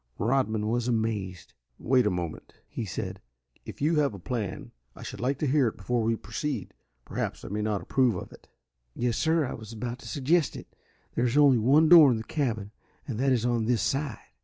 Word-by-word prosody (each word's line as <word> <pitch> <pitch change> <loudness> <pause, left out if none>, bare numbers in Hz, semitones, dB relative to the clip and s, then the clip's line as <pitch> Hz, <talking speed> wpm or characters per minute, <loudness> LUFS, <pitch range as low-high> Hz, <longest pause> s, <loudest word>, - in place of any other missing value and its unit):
Rodman 110 -3 0
was 120 +1 0
amazed. 110 -6 -2 0.2
"Wait 125 -2 +2
a - - +4
moment," 90 -4 -5
he 115 - -5
said. 90 - -5 0.4
"If - - -7
you 155 +1 +2
have 140 -7 +1
a - - -7
plan 105 +1 -4 0.2
I - - -10
should - - -7
like 130 +3 0
to 150 - -1
hear 140 -2 +3
it 110 - -4
before 120 +5 -1
we 115 +1 +1
proceed. 140 - -4 0.3
Perhaps - - -4
I - - -6
may 105 +2 -2
not 105 -2 -1
approve 125 -5 +2
of 90 - -7
it." - - -16 0.5
"Yes, 120 -2 0
sir, 160 +3 +2
I 130 - -4
was 110 0 -9
about 120 +3 -5
to - - -11
suggest 155 +2 +1
it. - - -11 0.4
There 120 - +1
is 120 +4 0
only 140 -5 +6
one 140 +8 +5
door 160 -4 +9
in 120 - +2
the 110 - -5
cabin, 110 -7 -2 0.4
and 120 -5 -4
that 135 +1 +2
is 120 -2 +1
on 120 -2 +1
this 120 0 +1
side. 135 -4 -1
120 Hz, 210 wpm, -27 LUFS, 110-135 Hz, 0.5 s, door